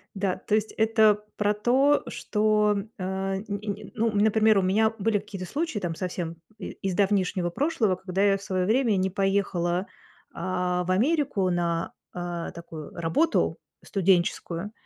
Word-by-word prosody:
Да, 195 -2 0
то 210 - -2
есть 215 0 0
это 220 -1 +3
про 210 0 +1
то, 265 +7 +3
что 210 0 +1
м 200 +2 -5
а 190 +1 -2
нь 195 - -8
нь 205 0 -4
нь - - -11
ну, 225 +1 +1
например, 215 0 +4
у - - +2
меня 215 +4 +3
были 210 +1 +1
какие-то 195 -2 -7
случаи 315 -6 -2
там 175 -4 -3
совсем 175 -2 -4 0.2
и 190 - -6
из 190 - 0
давнишнего 190 -3 +1
прошлого, 235 - +1
когда 185 +1 -2
я 200 -1 +4
в 195 - -10
своё 185 -2 -1
время 230 0 +2
не 190 0 +1
поехала, 195 -2 0 0.5
а, 180 0 -1
в 180 - -3
Америку 245 - +2
на, 170 -1 -1 0.2
а, 175 -1 -4
такую 165 -3 -9
работу 170 - +1 0.3
студенческую, 185 0 0
195 Hz, 160 wpm, -26 LUFS, 180-215 Hz, 0.5 s, например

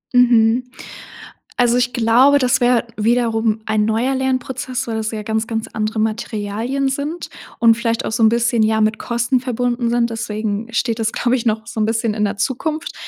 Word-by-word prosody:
Mhm. 240 -1 +4 0.9
Also, 245 -1 +3
ich 245 0 0
glaube, 250 +5 +4
das 250 -2 +2
wäre 240 -1 +2
wiederum 225 -1 +1
ein 215 -1 +1
neuer 230 +5 0
Lernprozess, 260 -1 -2
weil 225 -1 -2
es 220 0 -2
ja 215 -1 -4
ganz, 220 +1 -1
ganz 225 -1 -3
andere 215 0 -2
Materialien 220 +4 -2
sind 290 +5 -4 0.3
und 230 -1 +5
vielleicht 230 -1 -1
auch - - -3
so 225 - 0
'n 220 - +7
bisschen, 235 0 +1
ja, 220 0 +2
mit 215 0 +1
Kosten 240 +1 0
verbunden 245 -1 -1
sind, 235 0 +1
deswegen 215 -1 -3
steht 230 -1 0
das, 225 0 0
glaube 245 +1 +1
ich, 240 - -3
noch 220 0 -1
so 225 - -6
'n 215 - +2
bisschen 225 -1 -1
in 210 -1 +1
der 200 0 -3
Zukunft, 305 +8 -2
230 Hz, 190 wpm, -19 LUFS, 220-245 Hz, 0.9 s, n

